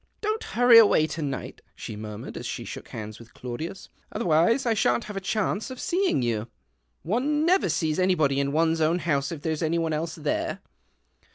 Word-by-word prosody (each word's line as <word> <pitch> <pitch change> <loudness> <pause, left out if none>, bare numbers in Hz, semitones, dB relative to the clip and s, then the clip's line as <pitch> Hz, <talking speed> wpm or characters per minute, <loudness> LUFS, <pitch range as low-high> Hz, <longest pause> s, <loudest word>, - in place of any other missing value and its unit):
" - - -44
Don't 430 +1 -1
hurry 245 -1 +8
away 200 -8 +5
to 155 +1 -5
night," 140 -3 -5
she 110 - -7
mur 105 0 -7
mured, - - -8
as - - -5
she - - -5
shook - - -8
hands 110 -1 -7
with 115 -1 -16
Claudius, 130 +10 -6
■' - - -35
otherwise 195 - +2
I 235 - +3
shan't 120 - +1
have 210 - -8
a 195 - -3
chance 210 +2 -1
of 260 -1 -8
seeing 360 - +1
you. 115 -2 -1 0.6
One 280 - 0
never 365 - +3
sees 160 0 0
anybody 155 -7 +2
in 140 0 0
one's 160 +1 +2
own 160 +2 +3
house 140 -6 -1
if 155 -4 -7
there's 160 -2 -2
any 165 +1 +1
one 165 -1 0
else 160 +2 -3
there." 150 -2 -2
165 Hz, 205 wpm, -26 LUFS, 140-215 Hz, 0.6 s, hurry